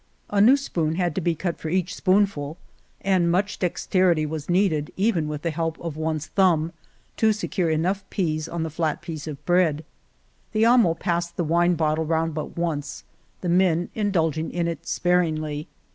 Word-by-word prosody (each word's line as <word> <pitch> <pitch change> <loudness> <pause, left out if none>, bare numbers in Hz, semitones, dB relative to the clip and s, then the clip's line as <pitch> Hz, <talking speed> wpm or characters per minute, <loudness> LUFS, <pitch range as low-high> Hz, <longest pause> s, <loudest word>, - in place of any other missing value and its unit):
A 200 -1 +3
new 250 +7 +7
spoon 165 - -1
had 175 -2 0
to 190 - -2
be 170 0 +1
cut 170 +1 -3
for 160 - -4
each 185 +1 0
spoonful 185 -6 +1 0.4
and 185 -3 +2
much 195 +4 0
dex 180 -2 -2
terity 175 -5 +3
was 155 0 -5
needed, 175 -5 +1
even 190 -6 +1
with 150 -1 -5
the 165 - 0
help 165 0 -2
of 165 -3 -5
one's 155 -1 -2
thumb, 170 -4 +2 0.4
to 220 -1 +4
secure 200 -5 -1
enough 180 +6 0
peas 155 -4 -1
on 170 -1 -3
the 160 - -4
flat 160 0 -2
piece 160 -3 -6
of 145 -1 -7
bread. 165 -3 +2 0.7
The 215 +1 +3
amo 230 -8 +5
passed 170 0 -2
the 175 - +1
wine 175 +2 +2
bottle 155 0 +1
round 165 0 0
but 155 +2 -5
once, 150 -4 -3 0.4
the 180 - -2
men 175 -1 +2
indulging 165 -7 0
in 170 -1 -1
it 170 - -5
sparingly. 155 -4 0
170 Hz, 180 wpm, -24 LUFS, 155-185 Hz, 0.7 s, new